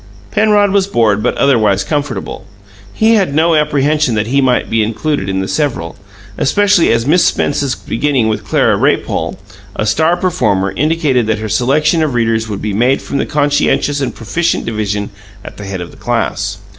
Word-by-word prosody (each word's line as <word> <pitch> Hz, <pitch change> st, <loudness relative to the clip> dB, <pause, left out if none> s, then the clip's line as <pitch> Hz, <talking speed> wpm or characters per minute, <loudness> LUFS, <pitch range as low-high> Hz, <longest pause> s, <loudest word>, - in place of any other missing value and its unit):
Penrod 210 Hz, -2 st, +3 dB
was 195 Hz, -1 st, +2 dB
bored 110 Hz, -, +1 dB
but -, -, -1 dB
otherwise 110 Hz, -8 st, +2 dB
comfortable; 140 Hz, -6 st, -4 dB, 0.4 s
he 220 Hz, +1 st, +2 dB
had 190 Hz, -10 st, +1 dB
no 165 Hz, +2 st, +3 dB
apprehension 150 Hz, -3 st, +1 dB
that 105 Hz, 0 st, 0 dB
he 135 Hz, +5 st, +1 dB
might 125 Hz, -2 st, +1 dB
be 115 Hz, 0 st, 0 dB
included 110 Hz, +1 st, -2 dB
in 95 Hz, 0 st, -1 dB
the 95 Hz, -, -3 dB
"several," 95 Hz, -, -2 dB, 0.4 s
especially 200 Hz, +2 st, +3 dB
as 115 Hz, 0 st, +1 dB
Miss 165 Hz, +5 st, +3 dB
Spence's 140 Hz, -2 st, 0 dB
beginning 125 Hz, +1 st, -1 dB
with 105 Hz, -1 st, -2 dB
Clara -, -, +1 dB
Raypole, -, -, -1 dB, 0.4 s
a 110 Hz, -, -2 dB
star 160 Hz, +10 st, +2 dB
performer, 105 Hz, -, 0 dB
indicated 150 Hz, -5 st, 0 dB
that 110 Hz, 0 st, 0 dB
her 110 Hz, 0 st, -5 dB
selection 145 Hz, -, +1 dB
of 150 Hz, -5 st, -1 dB
readers 115 Hz, -1 st, 0 dB
would 100 Hz, -2 st, -5 dB
be 105 Hz, -1 st, -2 dB
made 125 Hz, +6 st, +2 dB
from 140 Hz, -, -4 dB
the -, -, -1 dB
conscientious 145 Hz, 0 st, 0 dB
and 125 Hz, -3 st, -3 dB
proficient 160 Hz, +10 st, -1 dB
division 105 Hz, -2 st, -3 dB, 0.3 s
at -, -, -10 dB
the 105 Hz, -, -8 dB
head 95 Hz, -2 st, -5 dB
of 85 Hz, -, -8 dB
the -, -, -17 dB
class. -, -, -2 dB
130 Hz, 180 wpm, -14 LUFS, 110-155 Hz, 0.4 s, Penrod